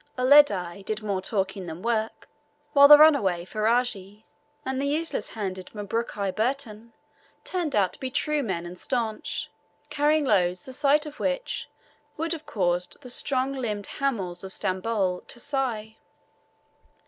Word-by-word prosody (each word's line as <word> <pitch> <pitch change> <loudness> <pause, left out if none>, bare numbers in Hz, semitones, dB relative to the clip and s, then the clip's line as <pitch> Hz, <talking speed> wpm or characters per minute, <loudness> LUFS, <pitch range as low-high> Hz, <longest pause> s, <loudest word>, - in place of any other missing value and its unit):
Uledi 230 -10 +4
did 215 +2 -4
more 200 -3 -1
talking 190 -2 -2
than 165 +2 -7
work; 225 -1 -2 0.5
while 280 0 +9
the 295 0 +11
runaway 235 - +4
Ferajji 215 -1 -1 0.4
and 265 0 -2
the 280 - 0
useless 320 +3 -2
handed 190 -4 -5
Mabruki 205 -1 -2
Burton 230 -2 -2 0.5
turned 345 -6 -2
out 195 -3 +2
to - - -9
be 260 - -3
true 300 +3 0
men 190 -8 -3
and 175 +1 -9
staunch, 230 -4 -2 0.4
carrying 300 +1 +2
loads 180 -6 +1
the 260 - -8
sight 290 +2 +2
of 300 -1 -9
which - - -2 0.5
would 325 +2 -1
have 310 -2 -8
caused 180 -8 -1
the 250 - -7
strong 260 +1 0
limbed 215 -6 -3
hamals 195 -11 -1
of 190 - -6
Stamboul 190 -1 -1
to 240 - -8
sigh. 240 -6 -3
225 Hz, 145 wpm, -26 LUFS, 195-275 Hz, 0.5 s, the